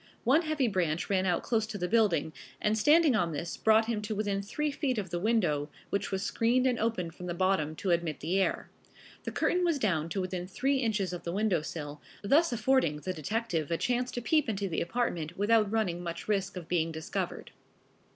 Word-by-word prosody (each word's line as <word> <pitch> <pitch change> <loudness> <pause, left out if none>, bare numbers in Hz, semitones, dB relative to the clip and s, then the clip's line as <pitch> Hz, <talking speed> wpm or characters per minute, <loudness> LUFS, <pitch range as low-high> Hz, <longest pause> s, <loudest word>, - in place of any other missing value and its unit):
One 275 +7 +4
heavy 310 -5 0
branch 175 -4 -1
ran 190 -1 +2
out 175 -2 +1
close 220 -2 0
to 215 -1 -5
the 180 -2 -2
building, 180 -8 +2 0.3
and 210 +1 +1
standing 295 +4 +5
on 175 -6 +1
this 170 +3 -4
brought 220 0 +4
him 225 -2 -2
to 210 +1 -3
within 200 -1 -1
three 295 +9 -2
feet 270 -3 -1
of 195 -4 -3
the 175 - -1
window, 175 -9 +1 0.2
which 200 0 -1
was 190 0 -1
screened 240 +5 +2
and 250 -2 +2
open 200 -7 -1
from 180 +2 -9
the 175 - -3
bottom 175 -4 +1
to 185 +3 -1
admit 170 -4 0
the 175 +6 0
air. - - -1 0.5
The - - -3
curtain 360 0 +1
was 335 -4 +2
down 170 - 0
to 195 - -2
within 185 -1 -4
three 270 +8 0
inches 210 -7 0
of 175 - -5
the 170 - -3
window 195 -3 +1
sill, 150 -2 -6 0.2
thus 295 +10 +4
affording 240 - +2
the 185 +5 -4
detective 175 -1 -2
a 165 - 0
chance 245 +3 0
to 245 - -4
peep 305 -1 +2
into 200 -2 -1
the 165 - -2
apartment 170 -5 -2
without 210 0 +3
running 190 -6 0
much 170 -1 -6
risk 195 -3 -1
of 170 -3 -7
being 165 -2 0
discovered. 160 0 -4
200 Hz, 210 wpm, -30 LUFS, 170-230 Hz, 0.5 s, standing